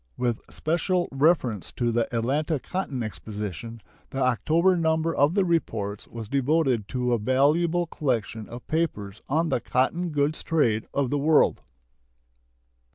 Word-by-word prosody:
With 120 -3 -1
special 175 +3 0
reference 135 - +1
to 120 -1 0
the 115 0 0
Atlanta 140 +6 0
Cotton 145 -7 -3
Exposition, 105 +4 -6 0.3
the 135 - -7
October 155 +8 +3
number 160 -1 +1
of 145 +5 +3
the 200 -2 +3
reports 110 - -1
was 115 -2 -7
devoted 135 -4 +1
to 125 -1 -1
a 120 - +1
valuable 155 +9 +2
collection 115 -8 -2
of 120 +1 -9
papers 110 -12 -2
on 160 +4 +1
the - - +1
cotton 170 +7 0
goods 150 0 0
trade 120 -10 +1
of 140 -3 0
the 145 - +1
world. 155 +2 +3
135 Hz, 140 wpm, -26 LUFS, 115-160 Hz, 0.3 s, October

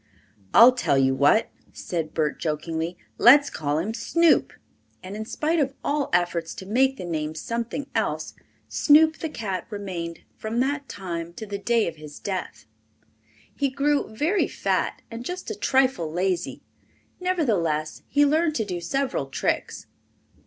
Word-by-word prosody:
"I'll 240 +2 +9
tell 245 - +1
you 135 0 +3
what," 145 - +3 0.2
said 165 -3 -4
Bert 155 -2 0
jokingly, 160 +2 -3 0.2
"Let's 285 +4 +7
call 145 -1 -1
him 195 +8 -2
Snoop," 335 +6 +3 0.5
and 185 +2 -7
in 215 +1 -5
spite 315 +8 0
of 270 -2 0
all 290 -1 0
efforts 170 -2 0
to 190 - -8
make 265 +6 +2
the 180 - -6
name 155 -2 -3
something 235 - -3
else - - -1 0.3
Snoop 315 +1 +5
the 320 - -3
cat 195 - -4
remained 185 -6 -5
from 220 +2 -3
that 280 +2 -1
time 170 -3 -5
to 220 - -7
the 200 -1 -5
day 230 +2 +2
of 165 - -5
his 150 -1 -10
death. 185 - -5 0.9
He 280 -1 0
grew 280 +2 0
very 310 - +1
fat - - -1
and 230 +1 -6
just 360 - -5
a - - -4
trifle 260 - +1
lazy, 180 +1 -1 0.6
nevertheless 200 - 0
he 290 +1 +4
learned 310 +2 +2
to 220 - 0
do 180 -3 -4
several 260 - -1
tricks. 135 - -2
215 Hz, 150 wpm, -25 LUFS, 170-280 Hz, 0.9 s, I'll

